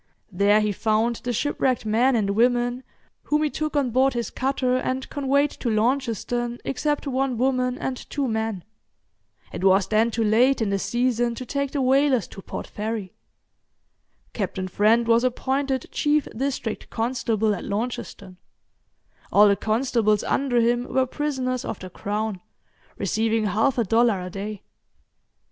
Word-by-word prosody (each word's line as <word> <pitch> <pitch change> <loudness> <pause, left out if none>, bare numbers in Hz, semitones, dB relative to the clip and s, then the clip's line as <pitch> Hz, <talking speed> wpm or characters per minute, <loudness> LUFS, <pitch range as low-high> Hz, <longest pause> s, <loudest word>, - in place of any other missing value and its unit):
There 200 +3 +3
he 210 0 +1
found 220 +3 +1
the 245 - -4
shipwrecked 255 0 0
men 240 +5 +3
and 205 -3 +1
women 245 +3 +2 0.4
whom 300 +1 +1
he 300 - 0
took 310 0 -3
on 275 -4 +1
board 265 +3 +3
his 235 -1 -2
cutter, 260 -1 0
and 260 0 -2
conveyed 280 +1 +1
to 240 - -4
Launceston, 240 +1 0
except 295 +3 -1
one 265 -2 -1
woman 255 0 +1
and 260 -1 -3
two 280 -2 -1
men. 220 -5 -2 0.9
It - - -5
was 190 0 +4
then 220 +2 +2
too 230 0 -1
late 240 +6 +3
in 215 -3 0
the 195 - 0
season 240 +1 0
to 255 - -6
take 280 +2 -2
the 275 -1 -1
whalers 265 -4 +3
to 195 - -10
Port - - -6
Fairy. 210 -3 -5 1.2
Captain 190 -2 -3
Friend 220 +5 +3
was 230 +1 +4
appointed 265 +1 -1
chief 295 -1 +1
District 255 -3 -3
Constable 225 -2 0
at - - -5
Launceston; 200 -3 -5 0.9
all 210 +1 +7
the 200 - +4
constables 220 -1 +1
under 265 -3 +1
him 240 +2 0
were 260 0 +2
prisoners 255 -3 -2
of - - -4
the 185 0 -10
Crown, 205 0 -3 0.6
receiving 220 +3 0
half 220 +7 +1
a 235 - +3
dollar 225 0 +2
a 180 - -7
day. 205 +1 -6
235 Hz, 155 wpm, -24 LUFS, 215-260 Hz, 1.2 s, all